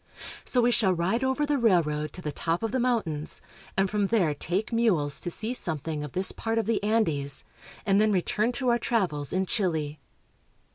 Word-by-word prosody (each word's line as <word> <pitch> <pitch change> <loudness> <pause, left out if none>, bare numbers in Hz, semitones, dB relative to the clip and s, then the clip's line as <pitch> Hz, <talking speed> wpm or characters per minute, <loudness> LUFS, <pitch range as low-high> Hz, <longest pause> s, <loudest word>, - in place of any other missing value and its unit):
So 250 - +2
we 240 +1 +3
shall 190 -6 +3
ride 190 +9 0
over 265 +3 +1
the 290 -1 0
railroad 155 -9 +2
to 180 - -6
the 150 - -2
top 165 +6 -2
of 225 - -1
the 260 - 0
mountains 215 -12 0 0.4
and 195 0 +3
from 205 0 0
there 190 -8 +2
take 185 +10 -2
mules 180 -12 +2
to 175 - -3
see 220 +7 -2
something 155 - -2
of 150 - -7
this 185 +1 +3
part 225 0 -2
of 225 - +1
the 220 -1 0
Andes, 160 -11 0 0.4
and 200 0 +4
then 215 0 +3
return 210 +4 +1
to 250 +1 0
our 240 0 +3
travels 180 - 0
in 190 +1 +1
Chile. 160 -8 -1
195 Hz, 195 wpm, -27 LUFS, 160-230 Hz, 0.4 s, and